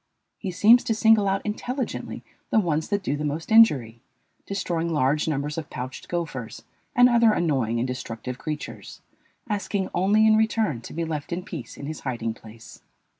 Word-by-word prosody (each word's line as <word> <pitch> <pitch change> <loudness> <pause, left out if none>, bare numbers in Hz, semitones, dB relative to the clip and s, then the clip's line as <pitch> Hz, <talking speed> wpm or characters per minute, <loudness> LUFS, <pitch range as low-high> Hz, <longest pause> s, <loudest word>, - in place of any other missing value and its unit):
He 195 - -4
seems 215 +7 +5
to 225 - 0
single 220 -2 +4
out 195 0 -1
intelligently 245 +4 -4 0.3
the 220 - +4
ones 160 -5 0
that 205 -1 -1
do 145 - -1
the 150 - -4
most 150 +6 -3
injury, 135 - +5 0.5
destroying 170 -4 -2
large 150 +1 +1
numbers 150 +1 -2
of 155 - -8
pouched 130 +1 -7
gophers 150 -10 -4 0.3
and 245 0 +7
other 235 -2 +4
annoying 135 - 0
and 120 +2 0
destructive 125 0 -6
creatures, 150 -1 -6 0.5
asking 200 -2 -2
only 205 +4 +3
in 220 0 +6
return 220 - +1
to - - -10
be 165 +1 -2
left 155 -1 -5
in 175 +1 -3
peace 170 - -8
in 140 - -7
his 155 +1 -5
hiding 115 -4 -3
place. 110 0 -14
165 Hz, 175 wpm, -25 LUFS, 135-210 Hz, 0.5 s, and